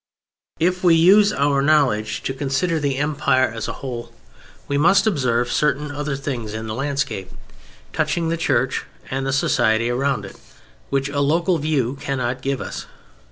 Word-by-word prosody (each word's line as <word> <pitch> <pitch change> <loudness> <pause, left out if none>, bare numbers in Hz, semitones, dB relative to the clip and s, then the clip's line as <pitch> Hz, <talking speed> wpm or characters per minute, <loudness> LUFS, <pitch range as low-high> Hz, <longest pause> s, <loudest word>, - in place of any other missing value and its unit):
If 180 +2 +1
we 170 -2 +6
use 200 +5 +6
our 140 -5 +1
knowledge 135 -8 +2
to 135 - -2
consider 145 +5 -1
the 140 -3 -1
Empire 140 -3 +2
as 115 -1 -4
a - - -2
whole, 120 -2 -5 0.6
we 140 - -1
must 175 +9 +4
observe 125 - +1
certain 150 0 0
other 145 0 -3
things 125 -6 -4
in 110 0 -5
the 110 - -4
landscape, 135 -6 -2 0.6
touching 160 +1 0
the 165 - 0
Church 135 -6 0 0.3
and 135 +1 -2
the - - 0
society 120 -4 +2
around 130 -4 0
it, 100 - -11 0.5
which 135 0 0
a 140 0 -2
local 165 +5 +2
view 140 -3 -1
cannot 130 -2 -2
give 135 -1 -2
us. - - -6
140 Hz, 160 wpm, -21 LUFS, 125-155 Hz, 0.6 s, we